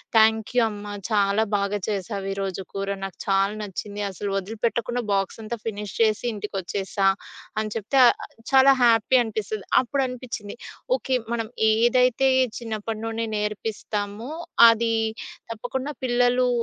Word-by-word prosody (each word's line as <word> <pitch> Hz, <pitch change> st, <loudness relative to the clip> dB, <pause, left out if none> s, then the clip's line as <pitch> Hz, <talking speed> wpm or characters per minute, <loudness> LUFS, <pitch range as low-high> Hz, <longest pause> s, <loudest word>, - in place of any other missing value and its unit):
"Thank you 220 Hz, +2 st, +4 dB
అమ్మా. 205 Hz, -1 st, -6 dB, 0.2 s
చాలా 205 Hz, 0 st, +3 dB
బాగా 200 Hz, +1 st, -1 dB
చేసావు 200 Hz, -1 st, -3 dB
ఈ -, -, -1 dB
రోజు 195 Hz, -1 st, -3 dB
కూర. 195 Hz, 0 st, -3 dB, 0.2 s
నాకు 195 Hz, -, -6 dB
చాలా 195 Hz, +1 st, +2 dB
నచ్చింది 205 Hz, +1 st, -5 dB
అసలు 200 Hz, +2 st, -5 dB
వదిలిపెట్టకుండా 230 Hz, +4 st, -2 dB
బాక్స్ 195 Hz, +2 st, 0 dB
అంతా 230 Hz, +2 st, -4 dB
ఫినిష్ 210 Hz, -2 st, -4 dB
చేసి 220 Hz, 0 st, +3 dB
ఇంటికొచ్చేసా" 195 Hz, -1 st, -2 dB, 0.5 s
అని 215 Hz, -1 st, -2 dB
చెప్తే 225 Hz, +5 st, -1 dB
ఆహ్, -, -, +6 dB, 0.4 s
చాలా 270 Hz, +1 st, +7 dB
హ్యాపీ 230 Hz, +2 st, +5 dB
అనిపిస్తది. 215 Hz, -2 st, -4 dB, 0.2 s
అప్పుడు 270 Hz, +2 st, -1 dB
అనిపించింది 235 Hz, -5 st, -6 dB, 0.4 s
ఓకే. 260 Hz, -, -1 dB, 0.2 s
మనం 225 Hz, -1 st, -2 dB, 0.2 s
ఏదైతే 250 Hz, +3 st, +3 dB, 0.3 s
చిన్నప్పటి 220 Hz, -1 st, -4 dB
నుండి 225 Hz, 0 st, -2 dB
నేర్పిస్తామో, 210 Hz, +2 st, -3 dB, 0.4 s
అది 230 Hz, 0 st, +2 dB, 0.6 s
తప్పకుండా 260 Hz, +6 st, -4 dB
పిల్లలు 245 Hz, +1 st, +3 dB
220 Hz, 125 wpm, -24 LUFS, 205-235 Hz, 0.6 s, చాలా